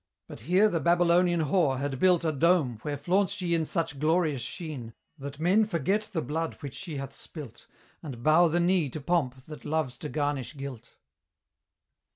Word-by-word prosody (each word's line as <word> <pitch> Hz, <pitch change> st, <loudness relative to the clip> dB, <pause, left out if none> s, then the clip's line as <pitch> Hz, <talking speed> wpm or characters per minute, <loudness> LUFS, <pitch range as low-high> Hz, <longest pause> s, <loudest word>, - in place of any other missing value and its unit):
But -, -, -10 dB
here 185 Hz, +6 st, +3 dB
the 175 Hz, -6 st, 0 dB
Babylonian 175 Hz, 0 st, +3 dB
whore 150 Hz, -3 st, +2 dB
had 135 Hz, -1 st, -3 dB
built 180 Hz, -1 st, +4 dB
A 160 Hz, -, +2 dB
dome, 150 Hz, -6 st, +2 dB
where 145 Hz, +2 st, -3 dB
flaunts 180 Hz, +7 st, +1 dB
she 180 Hz, -4 st, -2 dB
in 165 Hz, -1 st, +1 dB
such 160 Hz, -3 st, -2 dB
glorious 155 Hz, -3 st, +1 dB
sheen, 135 Hz, -7 st, -6 dB, 0.2 s
That 140 Hz, +1 st, -7 dB
men 185 Hz, +7 st, +4 dB
forget 205 Hz, +3 st, -1 dB
the 165 Hz, -6 st, -2 dB
blood 160 Hz, +5 st, -3 dB
which 140 Hz, -3 st, -6 dB
she 165 Hz, -7 st, -6 dB
hath 135 Hz, 0 st, -6 dB
spilt, 150 Hz, -8 st, -10 dB, 0.3 s
And 130 Hz, -7 st, -8 dB
bow 160 Hz, +4 st, +5 dB
the 170 Hz, +2 st, +1 dB
knee 175 Hz, -4 st, +2 dB
to 155 Hz, -, -6 dB
Pomp 135 Hz, -5 st, -1 dB
that 155 Hz, -1 st, -10 dB
loves 155 Hz, -5 st, -2 dB
to 150 Hz, -, -5 dB
garnish 145 Hz, -1 st, -2 dB
guilt. 130 Hz, -4 st, -8 dB
160 Hz, 180 wpm, -28 LUFS, 140-175 Hz, 0.3 s, bow